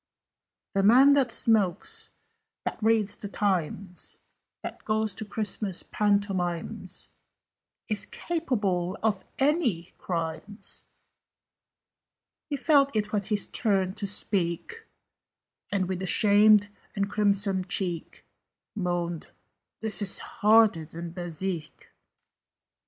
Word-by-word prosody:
"The 195 - +2
man 255 +8 +7
that 275 -3 +3
smokes 225 - +1 0.6
that - - -3
reads 220 -2 +2
the 205 - -6
Times 190 -2 -2 0.4
That - - -7
goes 215 -1 0
to 220 - -6
Christmas 210 -2 -2
Pantomimes 195 -5 -1 0.8
Is 215 -4 -1
capable 205 - -1
of 210 -4 +1
any 265 - +1
crimes!" 170 +4 -4 1.6
He 285 - -1
felt 280 -4 +3
it 210 -1 0
was 205 -2 0
his 210 -2 0
turn 195 -5 0
to 205 -1 -3
speak, 200 - 0 0.8
And, 195 -3 0
with 185 -1 -3
a 190 - -2
shamed 205 +1 +5 0.3
and 200 -1 0
crimson 200 -2 +1
cheek, 180 -3 -4 0.5
Moaned 175 -4 -2 0.5
"This 220 -1 -1
is 200 -2 0
harder 215 -5 +4
than 170 +2 -7
Bezique!" 175 -1 -5
200 Hz, 100 wpm, -27 LUFS, 185-220 Hz, 1.6 s, man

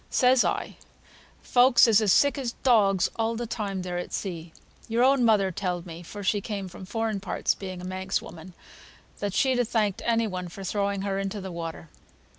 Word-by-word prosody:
Says 255 -1 +4
I, - - -2 0.7
'Folks 250 0 +5
is 225 -1 +5
as 210 -3 +3
sick 285 +7 +4
as 240 -3 -3
dogs 200 -7 +4
all 225 0 0
the 240 +1 -3
time 205 -4 -4
they're 180 -1 -3
at 175 - -6
sea. 170 -4 -5 0.4
Your 230 +2 +1
own 265 -1 +4
mother 210 -4 +3
telled 180 -2 -3
me 170 -1 -9
(for 205 +4 -9
she 200 +1 +1
came 200 -2 -4
from 185 +1 -10
foreign 225 -1 -2
parts, 190 -2 -1
being 185 -2 -7
a - - -9
Manx 190 +1 -2
woman) 175 +2 -11 0.7
that 205 -2 -3
she'd 260 -2 +2
ha - - +4
thanked 215 -4 0
any 230 -1 +2
one 185 -3 -4
for 195 +3 -9
throwing 200 0 -1
her 195 -1 -1
into 195 +1 -3
the 190 -1 -6
water.' 165 -1 -6
200 Hz, 200 wpm, -26 LUFS, 185-225 Hz, 0.7 s, Folks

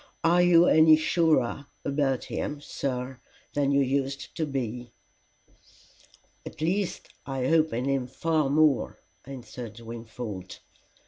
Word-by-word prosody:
Are 175 +2 +4
you 175 -1 +6
any 155 -1 +7
surer 155 -4 +1 0.2
about 140 -2 0
him, 145 - -4
sir, 130 -3 -4 0.3
than 140 -1 +1
you 140 0 +3
used 135 +1 -2
to 160 - -1
be?" 125 -3 -4 1.5
"At - - -10
least 180 +5 -2 0.2
I 135 -2 -2
hope 160 +1 +3
in 120 +3 -2
him 135 -2 0
far 155 +2 0
more," 150 -2 +2 0.3
answered 125 -4 -9
Wingfold. 115 -4 -7
140 Hz, 120 wpm, -27 LUFS, 125-155 Hz, 1.5 s, any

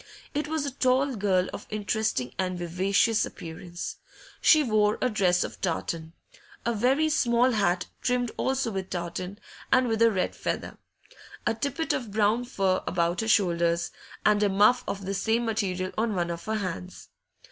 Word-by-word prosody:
It 295 +1 -1
was 310 -1 -1
a 280 - -2
tall 260 +1 +2
girl 190 -3 +2
of - - -7
interesting 210 - -1
and 185 -1 -1
vivacious 190 +6 +2
appearance; 175 +1 -7 0.4
she 310 -2 +6
wore 215 -4 +2
a 250 - +1
dress 180 -4 +2
of - - -7
tartan, 165 -2 -2 0.5
a 235 - +1
very 260 +8 +2
small 250 -4 +3
hat 185 -5 +1 0.2
trimmed 245 -2 0
also 265 -3 0
with 190 -2 -4
tartan 180 +2 -4 0.3
and 255 -1 +4
with 225 -1 0
a 230 - +7
red 190 -4 -1
feather, - - -4 0.7
a - - +2
tippet 280 +8 -2
of 240 -4 -3
brown 215 +4 +2
fur 195 -6 0
about 170 +1 0
her 220 - -3
shoulders, 170 -5 +2 0.3
and 210 -1 +4
a 205 - +3
muff 210 +6 +4
of 200 -1 -4
the 195 - -2
same 225 +4 +1
material 185 -4 -1
on 220 -2 0
one 175 -1 0
of 170 0 -6
her 220 - -1
hands. 185 - -5
210 Hz, 170 wpm, -27 LUFS, 180-240 Hz, 0.7 s, a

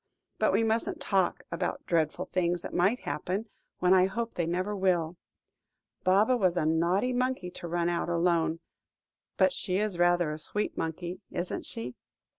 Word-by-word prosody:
but - - +3
we - - +3
mustn't 225 +1 0
talk 190 -3 +1
about 170 - -3
dreadful 165 +1 0
things 175 -2 0
that - - -6
might 195 +8 +2
happen, 180 +9 -2 0.3
when 180 +1 +4
I 185 0 +5
hope 230 +4 -3
they 170 -2 -1
never 185 +4 -1
will. 180 -4 +1 0.9
Baba 205 +7 +4
was 185 -6 +2
a 155 - +1
naughty 170 +10 +2
monkey 250 -7 -1
to 175 - -7
run 170 0 0
out 175 0 -1
alone. 170 -1 +1 0.8
But 190 -1 +4
she 185 0 -1
is 205 -4 -1
rather 175 -2 +3
a 150 - -5
sweet 210 +6 -2
monkey, 175 +3 -4
isn't 175 - -4
she?" 120 +2 -5
180 Hz, 165 wpm, -29 LUFS, 170-195 Hz, 0.9 s, I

